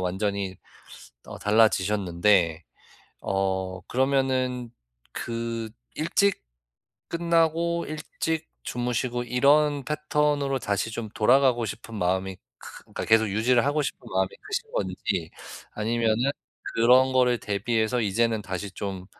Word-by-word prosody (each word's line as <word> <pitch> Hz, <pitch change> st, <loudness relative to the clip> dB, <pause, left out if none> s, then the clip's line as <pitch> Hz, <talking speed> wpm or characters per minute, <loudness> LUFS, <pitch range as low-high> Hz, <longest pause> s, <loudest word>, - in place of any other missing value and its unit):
완전히 95 Hz, +1 st, -2 dB, 0.7 s
어 -, -, -9 dB
달라지셨는데 95 Hz, -5 st, +2 dB, 0.6 s
어 95 Hz, -1 st, -1 dB
그러면은 130 Hz, -2 st, 0 dB, 0.4 s
그 115 Hz, -1 st, -4 dB, 0.3 s
일찍 195 Hz, +5 st, +1 dB, 0.7 s
끝나고 170 Hz, 0 st, +1 dB
일찍 160 Hz, +1 st, -3 dB, 0.2 s
주무시고 120 Hz, 0 st, -2 dB
이런 140 Hz, +3 st, +3 dB
패턴으로 150 Hz, -2 st, 0 dB
다시 100 Hz, +2 st, -1 dB
좀 115 Hz, -2 st, -4 dB
돌아가고 125 Hz, 0 st, +4 dB
싶은 115 Hz, +3 st, -7 dB
마음이 95 Hz, +1 st, -1 dB, 0.2 s
크 -, -, -12 dB
그니까 -, -, -6 dB
계속 110 Hz, -1 st, +4 dB
유지를 115 Hz, +5 st, +2 dB
하고 150 Hz, +1 st, +1 dB
싶은 140 Hz, -, -3 dB
마음이 95 Hz, 0 st, +1 dB
크신 445 Hz, +2 st, -4 dB
건지, -, -, -2 dB, 0.4 s
아니면은 115 Hz, +3 st, +1 dB, 0.4 s
그런 125 Hz, +3 st, +5 dB
거를 125 Hz, -2 st, +3 dB
대비해서 110 Hz, +3 st, 0 dB
'이제는 110 Hz, +1 st, +1 dB
다시 95 Hz, +1 st, -5 dB
좀 95 Hz, -2 st, -5 dB
115 Hz, 260 characters per minute, -26 LUFS, 100-140 Hz, 0.7 s, 그런